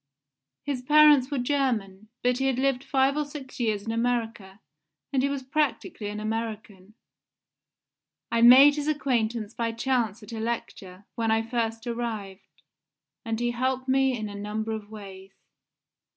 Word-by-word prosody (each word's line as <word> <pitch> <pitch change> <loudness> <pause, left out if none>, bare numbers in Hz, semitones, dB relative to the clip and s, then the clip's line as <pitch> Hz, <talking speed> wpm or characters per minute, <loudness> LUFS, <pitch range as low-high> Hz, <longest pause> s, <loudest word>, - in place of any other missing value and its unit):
His 280 -3 -3
parents 295 -1 +6
were 285 - -2
German, 245 -7 -1 0.2
but 250 +1 +1
he 270 - 0
had 265 -2 0
lived 270 -1 0
five 270 0 +2
or 300 - 0
six 285 -3 -10
years 215 -4 0
in 225 - -2
America, 225 -4 -2 0.5
and 265 - +2
he 280 - +1
was 280 -1 -3
practically 265 -6 -2
an 210 +1 -5
American. 215 -2 -5 1.4
I 230 - +1
made 270 +5 +8
his 295 0 -3
acquaintance 235 -7 -1
by 230 -1 -2
chance 230 -3 -1
at 210 - -11
a 225 - -4
lecture, 205 -4 -5
when 230 -2 -1
I 225 0 +2
first 225 -1 -3
arrived, 225 -5 -6 0.6
and 225 0 -3
he 240 0 0
helped 260 +2 -2
me 265 -1 +2
in 215 -1 -4
a 205 - -8
number 210 +2 -4
of 215 -2 -6
ways. 195 -3 -11
235 Hz, 155 wpm, -26 LUFS, 215-265 Hz, 1.4 s, made